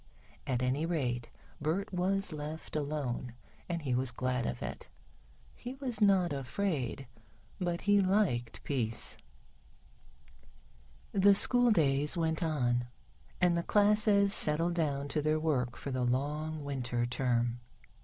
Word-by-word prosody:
At 130 -2 0
any 135 +6 0
rate, 125 -8 -2 0.3
Bert 170 +7 -1
was 185 0 0
left 155 +2 -6
alone 140 -5 -3 0.3
and 170 -2 -2
he 130 -3 -1
was 125 0 +2
glad 125 -1 -1
of - - -4
it. - - -6 0.7
He 250 +2 -8
was 255 -5 -3
not 190 -6 +4
afraid, 140 - -2 0.5
but 175 -1 -1
he 205 0 +4
liked 185 - 0
peace. 115 -6 -1 2.0
The 200 0 +5
school 245 +4 +5
days 150 -4 +2
went 160 0 0
on, 125 -7 0 0.5
and 180 -1 +3
the 170 - +1
classes 205 0 +3
settled 165 0 +1
down 145 -4 -1
to 150 - 0
their 155 +1 +1
work 130 -6 0
for 140 - -6
the 130 -1 -1
long 150 +5 -1
Winter 125 -4 -2
term. 120 -1 0
150 Hz, 130 wpm, -32 LUFS, 125-180 Hz, 2.0 s, The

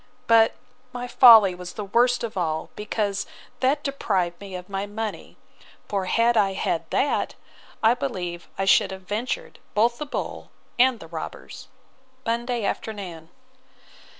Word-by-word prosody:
But 225 -1 +5 0.4
my 245 0 -5
folly 225 -7 +8
was 180 0 -8
the 210 - -5
worst 245 +5 +2
of 230 - -4
all, 160 -4 -2
because 210 -1 -2 0.3
that 270 +3 +1
deprived 190 -11 -1
me 195 -2 -8
of 180 0 -7
my 195 0 -3
money: 215 +1 -6 0.5
for 195 -2 -1
had 230 +5 +2
I 200 -3 +3
had 165 -3 -2
that, 285 - 0 0.5
I 225 +2 +6
believe 180 -10 -4
I 195 - 0
should 195 - +5
have 190 0 -8
ventured 245 - -4 0.2
both 235 +3 +2
the 300 - -4
bull - - -5 0.3
and 250 -2 +4
the - - -10
robbers. 160 -1 -8 0.6
Monday 235 -1 -1
afternoon. 185 -8 -5
210 Hz, 145 wpm, -24 LUFS, 185-240 Hz, 0.6 s, folly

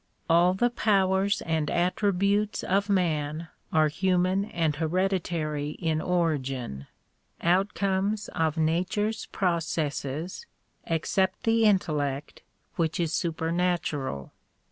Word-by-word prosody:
All 175 +2 +4
the 240 +5 +2
powers 195 -2 +2
and 160 -2 -1
attributes 200 +3 +1
of 200 +2 +1
man 160 -4 0 0.2
are 155 -1 +4
human 185 +4 +1
and 165 -8 -1
hereditary 165 -3 -1
in 160 -3 0
origin, 135 - -1 0.5
outcomes 195 +3 +1
of 160 -1 -1
nature's 185 +7 0
processes, 165 - -2 0.4
except 185 +3 0
the 225 0 +3
intellect, 150 -8 0 0.4
which 165 -1 0
is 165 -2 0
super 165 -1 -1
natural. 160 - -1
175 Hz, 100 wpm, -27 LUFS, 155-195 Hz, 0.5 s, All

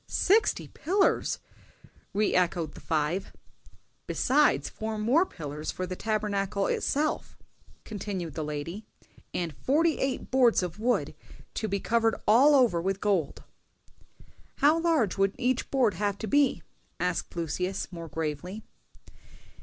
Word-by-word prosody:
"Sixty 415 +3 +2
pillars!" 390 +5 +1 0.7
re 210 +1 +1
echoed 175 -3 +1
the - - -12
five. 160 +5 -1 0.8
"Besides 295 +3 +2
four 220 0 -5
more 260 - +3
pillars 150 0 -6
for 185 - -4
the 185 0 -5
Tabernacle 205 -2 -1
itself," 300 +2 -1 0.5
continued 195 -6 -5
the 155 - -3
lady, 150 +7 -5 0.5
"and 170 -5 -3
forty 310 - +1
eight 270 -1 -2
boards 250 -6 +4
of 180 +2 -5
wood, 245 +3 0 0.4
to 220 - -2
be 200 -1 -1
covered 225 +2 +2
all 270 +7 +6
over 235 -11 +4
with 195 +2 -1
gold." 195 -9 0 1.1
"How 305 +3 +4
large 310 - +1
would 195 0 +2
each 255 +1 0
board 250 -7 +2
have 205 -1 -1
to 220 - -5
be?" 285 +4 +2 0.4
asked 180 0 -2
Lucius, 180 +4 -3
more 170 -2 -7
gravely. 160 +7 -4
205 Hz, 130 wpm, -28 LUFS, 175-255 Hz, 1.1 s, all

